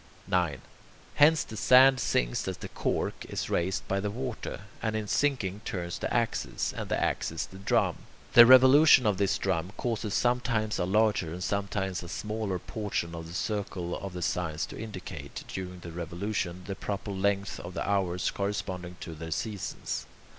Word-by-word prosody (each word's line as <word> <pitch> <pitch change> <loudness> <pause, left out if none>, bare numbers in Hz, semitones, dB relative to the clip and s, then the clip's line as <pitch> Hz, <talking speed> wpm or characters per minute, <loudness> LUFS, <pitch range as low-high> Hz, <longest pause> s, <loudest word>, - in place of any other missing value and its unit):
9. 85 -7 0 0.6
Hence, 155 +2 +6
the 110 - -9
sand 130 +4 +6
sinks - - 0
as - - -3
the - - -8
"cork" - - -2
is - - -3
raised 95 +3 0
by 95 - 0
the 105 +1 -2
water, 125 0 -5 0.2
and 110 -1 -1
in 110 -1 -2
sinking 105 -8 0
turns 85 -4 -4
the - - -3
axis, 115 -1 -1
and - - -5
the - - +1
axis - - -1
the 95 - -13
drum. 100 - +1 0.4
The 120 -1 +10
revolution 130 +1 +8
of 100 -3 +2
this 100 -1 +2
drum 95 0 -1
causes 115 -4 -2
sometimes 120 -3 +1
a 90 - +1
larger 105 -3 +2
and 90 +2 -5
sometimes 100 -1 -1
a 85 - -9
smaller 105 -2 -3
portion 95 -3 -3
of 80 -1 -6
the 85 - -9
circle 95 -4 -2
of 100 -2 -6
the 90 -1 -4
signs 80 -3 -1
to - - -10
indicate, 90 -9 -7
during 90 -1 -6
the 85 - -8
revolutions, 90 +2 -3
the 100 - -4
proper 100 +1 -4
length 100 +1 0
of 90 +1 -8
the - - -2
hours 95 -3 +1
corresponding 95 -3 -3
to 80 - -6
their 80 +1 -7
seasons. 100 +5 -4
100 Hz, 175 wpm, -29 LUFS, 90-110 Hz, 0.6 s, The